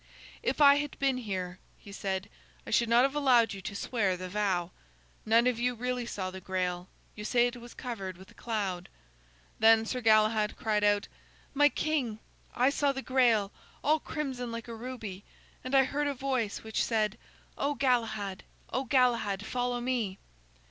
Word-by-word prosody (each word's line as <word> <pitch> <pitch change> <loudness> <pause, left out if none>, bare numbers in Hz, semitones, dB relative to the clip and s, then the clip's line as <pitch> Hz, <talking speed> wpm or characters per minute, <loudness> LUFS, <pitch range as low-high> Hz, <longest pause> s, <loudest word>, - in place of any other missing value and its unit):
"If - - -1
I 280 0 +8
had 290 -1 -3
been 270 -2 +1
here," 185 -6 -4 0.2
he 200 - -13
said, 195 -1 -3 0.4
"I - - -7
should 235 +1 +3
not 235 +2 +6
have 270 +1 +2
allowed 250 -7 +4
you 195 - -7
to 200 - -6
swear 200 -3 0
the 185 0 -6
vow. 185 -3 0 0.6
None 230 +2 +5
of 250 -2 +1
you 245 +1 0
really 250 0 -2
saw 185 -5 -4
the 190 0 -8
Grail; 180 -1 -2 0.2
you 210 - -8
say 240 +2 +3
it 245 0 -2
was 240 0 -12
covered 195 -8 -5
with 190 +1 -14
a - - -18
cloud." 195 -6 -3 0.7
Then 225 0 +6
Sir 250 +2 -3
Galahad 215 -1 +3
cried 210 -2 0
out: 205 0 +3 0.5
"My 290 +1 +5
king, 285 -9 -1 0.4
I 255 +3 +3
saw 285 -1 +2
the 270 -1 -5
Grail, 235 -6 +3 0.3
all 310 +2 +3
crimson 260 -6 -4
like 230 0 -6
a 235 - -6
ruby, 225 -5 -7 0.4
and 255 +2 -1
I 270 - +7
heard 290 +2 -1
a 285 - -1
voice 255 -5 -2
which 220 0 -1
said, 215 -2 0 0.4
'O 285 +1 -1
Galahad, 220 -7 0 0.3
O 260 +1 0
Galahad, 235 -6 +2
follow 245 +1 -1
me!'" 240 -6 -1
230 Hz, 175 wpm, -30 LUFS, 205-255 Hz, 0.7 s, I